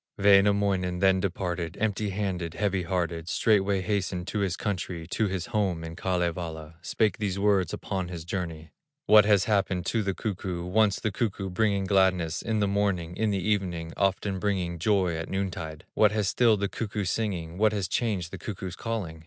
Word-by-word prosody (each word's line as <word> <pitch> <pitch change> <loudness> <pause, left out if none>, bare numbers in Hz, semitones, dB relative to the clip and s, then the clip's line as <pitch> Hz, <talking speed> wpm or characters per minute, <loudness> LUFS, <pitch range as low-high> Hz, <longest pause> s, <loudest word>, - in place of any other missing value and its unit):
Wainamoinen 100 -2 +4
then 95 0 +4
departed, 90 -3 -3
Empty 105 -1 0
handed, 95 -4 -3
heavy 100 -2 0
hearted, 85 -1 -2
Straightway 100 -1 +2
hastened 95 -3 -2
to 105 - -2
his 95 -3 0
country, 90 -4 -3
To 110 - +1
his 95 -2 -3
home 100 -8 -1
in 80 0 -7
Kalevala, 85 -3 -3
Spake 105 +3 0
these 100 -3 -1
words 100 -3 +2
upon 95 -2 -3
his 85 -2 -7
journey: 85 -4 -5 0.3
"What 105 -4 +7
has 105 -2 +4
happened 100 -4 0
to 115 +5 +1
the 95 -2 -2
cuckoo, 95 -5 -3
Once 100 +2 +2
the 110 - -1
cuckoo 100 -3 -2
bringing 100 0 +1
gladness, 95 -4 +2
In 110 -2 -1
the 100 - +2
morning, 100 -4 0
in 110 -1 +1
the 95 -2 -1
evening, 90 -6 -1
Often 95 0 0
bringing 90 -4 -1
joy 95 -2 +2
at 80 0 -5
noontide? 90 -4 -4
What 105 -1 +4
has 105 -2 0
stilled 110 -3 +3
the 100 - +1
cuckoo's 100 -3 -3
singing, 90 -6 -3
What 110 0 +4
has 100 -3 -1
changed 95 -5 -1
the 95 - -7
cuckoo's 95 -3 -6
calling? 105 -9 -4
95 Hz, 180 wpm, -27 LUFS, 90-105 Hz, 0.3 s, What